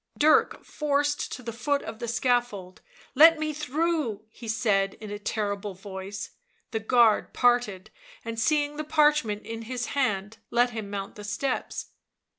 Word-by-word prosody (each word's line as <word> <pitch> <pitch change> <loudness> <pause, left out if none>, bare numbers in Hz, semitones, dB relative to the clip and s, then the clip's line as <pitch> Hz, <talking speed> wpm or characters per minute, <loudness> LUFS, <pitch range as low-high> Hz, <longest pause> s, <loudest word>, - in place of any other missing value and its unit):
Dirk 310 +1 +3
forced 290 -1 0
to 255 - -6
the 230 0 -5
foot 280 +5 0
of 220 0 -7
the 235 - -4
scaffold. 240 -6 -1 0.2
" - - -25
Let 325 0 +9
me 310 0 -2
through," 300 -7 -1
he 235 - -11
said 205 -3 +1
in 215 -1 -9
a 205 - -5
terrible 205 -2 -3
voice; 195 +1 -7 0.4
the 225 - -1
guard 225 -1 +3
parted; 240 -6 +2 0.3
and 230 0 -4
seeing 295 +3 +1
the 305 - -2
parchment 295 -9 +2
in 225 0 -6
his 240 +1 -4
hand, 215 -6 -1
let 245 +1 +3
him 220 -3 -5
mount 200 -1 -5
the 210 - -8
steps. 255 +6 -3
230 Hz, 160 wpm, -27 LUFS, 205-285 Hz, 0.4 s, Let